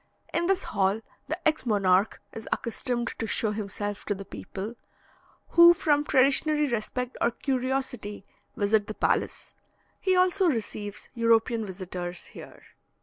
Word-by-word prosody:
In 345 - +1
this 385 0 +1
hall 195 +3 0 0.3
the 315 +2 -2
ex 315 0 +1
monarch 200 -3 +2
is 225 - -8
accustomed 240 0 -1
to 225 - -2
show 220 -1 +1
himself 205 -1 -4
to 205 - -1
the 195 0 -8
people, 190 - -7 0.8
who, 340 0 +8
from 295 -3 +2
traditionary 295 +3 +3
respect 245 +1 -3
or 235 - +4
curiosity, 255 -5 -3 0.3
visit 205 0 +2
the 215 - -5
palace. - - -1 0.5
He 375 -1 +2
also 365 0 +3
receives 210 -5 -3
European 230 -1 +2
visitors 180 -2 -5
here. - - -12
230 Hz, 135 wpm, -27 LUFS, 205-275 Hz, 0.8 s, who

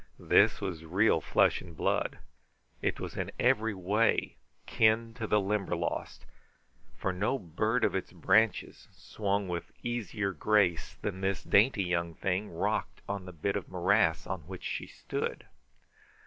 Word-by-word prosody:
This - - +4
was 85 -4 -4
real 90 +1 +3
flesh - - +3
and 85 -3 -12
blood. - - 0 0.6
It - - -1
was - - -6
in - - -3
every 115 -4 +2
way 105 +5 +1 0.3
kin 110 +1 +2
to 115 -1 -4
the 105 - +3
Limberlost, 100 -10 -2 0.7
for 95 - -1
no 105 +9 0
bird 110 +5 -1
of - - +3
its - - -3
branches 110 -2 +1
swung 100 -1 -2
with 85 -1 -4
easier 110 -4 -2
grace 95 -4 +1
than 95 -2 -3
this 95 0 -1
dainty 105 -1 +4
young 85 -2 -1
thing 95 +2 -1
rocked 105 +6 -2
on 100 -2 -4
the 90 - -8
bit 90 +4 -2
of 100 - -4
morass 90 -2 +2
on 95 -1 -3
which 95 -1 -8
she - - -4
stood. - - -4
100 Hz, 150 wpm, -30 LUFS, 90-110 Hz, 0.7 s, This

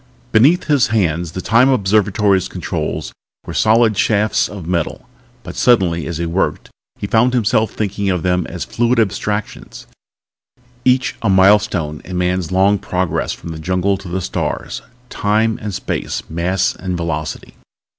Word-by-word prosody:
Beneath 140 +11 +4
his 140 -4 +2
hands 85 -6 0
the 95 - -4
Time 120 +6 +4
Observatory's 100 -4 +2
controls 90 -5 -4 0.3
were - - -6
solid 110 0 +3
shafts 105 +2 +1
of 100 -5 -8
metal. 85 -2 -2 0.4
But - - -8
suddenly 90 -9 +2
as 85 -2 -4
he 85 - -2
worked 85 +3 -2 0.3
he - - -4
found 120 +5 +2
himself 110 -1 +1
thinking 100 -1 -2
of 90 -3 -1
them 90 -2 0
as 90 -1 -5
fluid 120 +1 +1
abstractions, 105 0 -3 1.0
each 130 +1 +2
a 115 - 0
milestone 95 -5 +3
in 90 0 -6
man's 90 -1 -1
long 95 +2 +3
progress 90 -3 -2
from - - -8
the 80 - -7
jungle 95 +4 0
to 95 - -11
the 90 +2 -3
stars. - - -3 0.3
Time 110 +2 +1
and 105 -1 -4
space 95 - -3
mass 85 +3 0
and 90 -1 -4
velocity. 80 -2 -4
95 Hz, 150 wpm, -18 LUFS, 90-110 Hz, 1.0 s, Beneath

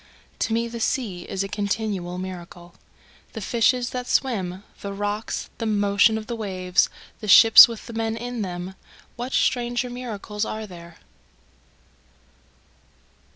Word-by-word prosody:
To 225 - -1
me 230 +1 0
the 235 0 -7
sea 210 -7 -2
is 195 0 -2
a - - -4
continual 200 -3 -3
miracle, 175 -1 -8 0.6
The 225 - -5
fishes 240 +3 +1
that 250 -1 -4
swim 190 -7 -1 0.2
the 200 0 -5
rocks 205 +2 -3
the 225 - -2
motion 205 +1 +3
of 220 - -6
the 235 - -4
waves 185 -4 0 0.3
the 215 - -7
ships 225 +2 +10
with 230 -2 -8
the 235 - -9
men 225 0 -2
in 245 0 -5
them, 180 -1 -5 0.4
What 245 +2 -5
stranger 240 0 0
miracles 215 -4 -5
are 220 0 -4
there? 170 -3 -12
215 Hz, 140 wpm, -24 LUFS, 190-235 Hz, 0.6 s, ships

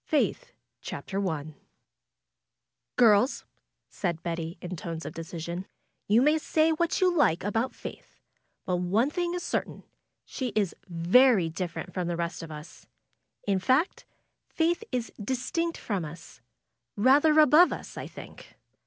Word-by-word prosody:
FAITH 485 +10 0 0.3
CHAPTER 195 0 -3
I 155 -1 -5 1.4
Girls," 230 +1 +4 0.4
said 170 -4 -3
Betty, 165 0 -4
in 180 +1 -6
tones 165 -1 -6
of - - -6
decision, 170 +2 -6 0.4
^^yon 225 +4 +5
may 305 +2 +4
say 315 +1 +2
what 340 +3 0
you 365 -1 +3
like 190 - +3
about 225 +5 -1
Faith, - - -10 0.5
but 180 -1 0
one 200 +10 +1
thing 350 +1 -1
is 355 - -4
certain, - - -3 0.4
she 255 -4 -4
is 205 -5 +1
very 185 +3 +4
different 170 +1 -5
from 180 -2 -2
the 175 -1 -2
rest 170 0 -3
of 165 - -8
us. 150 +2 -11 0.6
In 195 -2 +1
fact. 260 - +1 0.4
Faith 340 +5 0
is 240 -2 -2
distinct 265 +9 -2
from 200 -6 -3
us; 155 -6 -10 0.6
rather 290 +7 +5
above 310 +4 +7
us, - - -7
I - - -6
think. - - -12
205 Hz, 140 wpm, -28 LUFS, -, 1.4 s, above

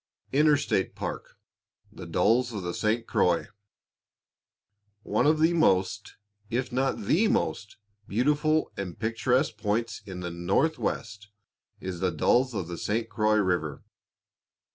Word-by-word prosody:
INTERSTATE 145 -8 +2
PARK - - -6 0.5
THE - - -10
DALLES 120 +2 +2
OF 100 -3 -4
THE 90 0 -3
ST. 110 +2 0
CROIX. 90 -5 +1 1.5
One - - +1
of 155 +1 +4
the 165 +2 +4
most, 95 - +1 0.3
if 125 +2 -2
not 130 +2 0
the 210 +8 +3
most, 110 - -1 0.3
beautiful 150 +7 +1
and 90 -4 -5
picturesque 115 +3 0
points 115 +2 -2
in 90 -2 -7
the 90 -1 -4
Northwest 105 - -1 0.5
is 95 -2 -5
the 95 0 +1
Dalles 120 +9 +2
of 95 -5 -3
the 85 -1 -6
St. 115 +2 -1
Croix 110 -1 +2
river. 90 -7 0
110 Hz, 125 wpm, -27 LUFS, 95-130 Hz, 1.5 s, of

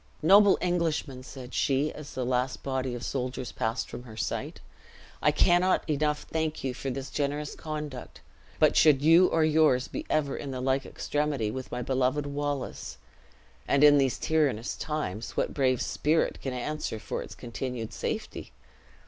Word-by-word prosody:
"Noble 200 +4 +7
Englishman," 165 -7 -1
said 130 -1 -10
she, 140 +2 +1
as 150 -1 -10
the 130 - -2
last 125 +1 -1
body 130 -2 -2
of 120 - -6
soldiers 125 -2 -3
passed 115 +1 -2
from - - -8
her 110 -3 -12
sight, - - -3 0.6
"I - - +4
cannot 175 +4 +3
enough 150 0 0
thank 160 -1 -3
you 130 -1 -1
for 135 +2 -5
this 135 +1 -5
generous 145 +1 -2
conduct; 150 -4 -6 0.4
but - - +4
should 145 -3 +5
you 165 +4 +7
or 165 - +2
yours 155 -5 +3
be 305 +2 -6
ever 145 -3 +1
in 140 - -6
the 130 -1 -4
like 130 +1 0
extremity 145 -7 -1
with 130 +1 -6
my 125 - -3
beloved 130 +3 0
Wallace 145 -1 -4 0.7
(and 140 +1 +3
in 145 -1 +8
these 135 -2 +1
tyrannous 140 -8 0
times, 120 -9 -4
what - - 0
brave 130 -3 +1
spirit 155 +2 0
can 135 - -3
answer 125 -1 -3
for - - -4
its - - -9
continued 120 -1 -5
safety?) - - -4
140 Hz, 165 wpm, -28 LUFS, 125-150 Hz, 0.7 s, in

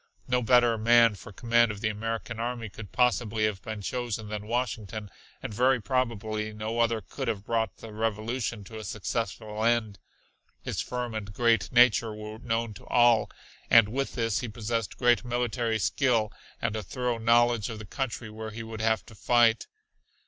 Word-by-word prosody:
No 125 0 +2
better 120 -1 +4
man 115 0 +6
for 105 +2 -11
command 120 +2 +3
of 105 -2 -5
the 110 - +1
American 115 +2 -4
army 120 -1 -3
could 100 0 -10
possibly 120 -3 +2
have 105 -3 -2
been 110 -3 -6
chosen 115 -2 -3
than 105 0 -5
Washington, 110 -3 -3 0.3
and - - -5
very 130 +4 +3
probably 110 -2 -1
no 110 +2 -3
other 115 -1 +2
could - - -6
have 100 -1 -2
brought 115 -3 -1
the 110 -2 -10
revolution 110 +1 -2
to 110 +3 -9
a - - -7
successful 105 0 -3
end. 115 -4 +1 0.6
His - - -2
firm 125 -2 -4
and 105 -2 -5
great 115 -1 +2
nature 120 -2 +4
were 105 +1 -8
known 115 -1 -2
to - - -14
all, 120 -2 +4 0.4
and 115 -3 +7
with 135 +4 -2
this 115 -5 0
he 125 - -4
possessed 115 -1 -3
great 120 -1 +3
military 120 -2 -1
skill 115 -2 +1 0.3
and 115 -2 -1
a 110 - -2
thorough 120 +4 -2
knowledge 120 0 +3
of 115 - -6
the 110 - -8
country 120 -1 -4
where 110 0 -6
he 110 +1 -7
would 110 -1 -6
have 110 0 +1
to - - -14
fight. 115 +1 +3
115 Hz, 180 wpm, -28 LUFS, 110-120 Hz, 0.6 s, and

